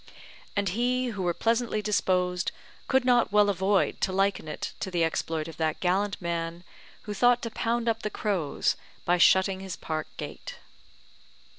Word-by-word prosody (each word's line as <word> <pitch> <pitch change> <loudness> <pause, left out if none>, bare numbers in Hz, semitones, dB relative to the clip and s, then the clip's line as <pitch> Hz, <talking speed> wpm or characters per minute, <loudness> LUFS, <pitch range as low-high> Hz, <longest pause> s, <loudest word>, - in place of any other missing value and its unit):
And 200 -1 +1
he 250 +5 0
who 205 -4 -4
were 175 -1 +1
pleasantly 230 -1 +1
disposed 180 -3 +1 0.4
could 265 -2 +2
not 245 -4 +4
well 205 0 +5
avoid 195 +1 +1
to 190 - +1
liken 195 -3 +1
it 150 - -5
to - - -3
the 175 -2 +1
exploit 160 -1 -1
of 165 -1 -9
that 160 -1 -1
gallant 195 +3 0
man 170 0 -3 0.4
who 210 - -5
thought 245 +4 +3
to 230 - -3
pound 235 +1 -1
up 225 0 +1
the 215 - -2
crows 190 -9 0 0.3
by 175 0 +2
shutting 190 +2 +5
his 190 -2 -6
park 155 -1 -4
gate. - - -7
195 Hz, 165 wpm, -27 LUFS, 175-225 Hz, 0.4 s, well